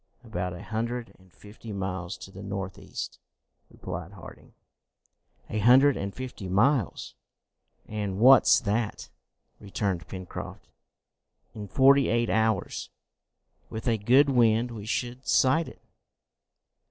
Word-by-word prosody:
"About 90 -6 -4
a 90 - -9
hundred 115 +2 -4
and 95 -1 -22
fifty 105 +5 -12
miles 95 -1 -4
to 95 - -11
the 95 - -10
north 95 -2 -5
east," - - -7 0.5
replied 85 +3 -7
Harding. 95 - -13 0.9
"A 110 - -3
hundred 130 +5 +6
and 100 0 -4
fifty 125 -5 -7
miles! 115 +4 +1 0.7
And 105 -3 -4
what's 130 +4 +7
that?" 110 +1 -2 0.5
returned 95 -3 -3
Pencroft. 95 -2 -8 0.9
"In 105 -2 -7
forty 135 +4 +5
eight 115 0 +1
hours, 110 0 0 0.8
with 110 +3 -6
a 115 -2 +2
good 130 +7 +4
wind, 120 -1 +3
we 110 -2 -8
should 125 +2 -3
sight 155 +5 +3
it!" - - -13
110 Hz, 120 wpm, -27 LUFS, 95-125 Hz, 0.9 s, what's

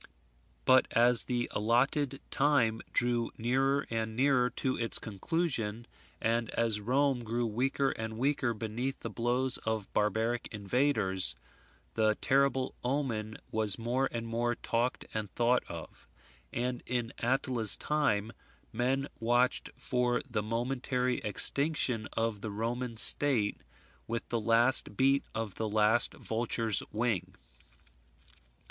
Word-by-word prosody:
But 130 0 +5
as 120 0 +5
the 120 -1 -1
allotted 130 +5 +1
time 130 -6 +2
drew 120 -1 +1
nearer 135 +4 +1
and 110 -1 -2
nearer 130 -1 +3
to 130 +1 -2
its 115 -1 +2
conclusion, 115 - -2 0.3
and 115 0 0
as 115 -2 +1
Rome 130 +2 +1
grew 120 +2 -1
weaker 135 +5 0
and 110 0 -5
weaker 130 -2 0
beneath 115 +5 -4
the - - -5
blows 125 +2 0
of 110 -3 -4
barbaric 110 +3 0
invaders, 105 -3 +2 0.6
the 110 -1 +2
terrible 135 -1 +1
omen 125 -5 -2
was 110 -3 +3
more 125 +4 -1
and 115 -1 -4
more 120 +1 -1
talked 120 +3 -2
and 110 -2 -3
thought 120 +1 +3
of; 85 -1 -10 0.4
and 125 +1 -2
in 120 -1 -2
Attila's 120 -3 +1
time, 115 -8 0 0.4
men 130 +4 0
watched 120 +2 +1
for 125 -1 0
the 120 -5 -2
momentary 125 +3 -1
extinction 125 +1 +1
of 115 -2 -1
the 110 - -4
Roman 115 +3 -3
state 115 -4 +4 0.5
with 115 0 -4
the 115 -1 -1
last 115 0 +2
beat 135 +1 +3
of 110 -3 -3
the 110 -1 -3
last 110 +2 +3
vulture's 115 -1 0
wing. 110 -4 -2
120 Hz, 125 wpm, -31 LUFS, 110-130 Hz, 0.6 s, But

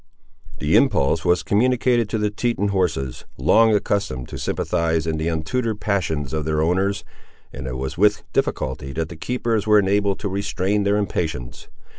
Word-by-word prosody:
The - - +1
impulse 70 +4 +3
was 90 0 +2
communicated 120 +1 +2
to 110 - -1
the 105 -1 0
Teton 105 -2 -1
horses, 80 -10 -1
long 110 - +4
accustomed 100 -12 -1
to - - -7
sympathise 80 -1 0
in 80 -1 -1
the 80 +1 -2
untutored 105 +8 -1
passions 80 -10 -1
of 80 -1 -1
their 75 0 -1
owners, 95 +4 0 0.5
and 65 -1 -6
it 65 0 -4
was 65 +5 -5
with 105 0 +3
difficulty 65 +1 -2
that 80 0 -3
the 85 - -8
keepers 115 +3 -1
were 105 0 +6
enabled 100 0 +2
to 105 - -2
restrain 100 +1 -1
their 100 +1 +2
impatience. 80 -11 -3
95 Hz, 165 wpm, -22 LUFS, 80-105 Hz, 0.5 s, were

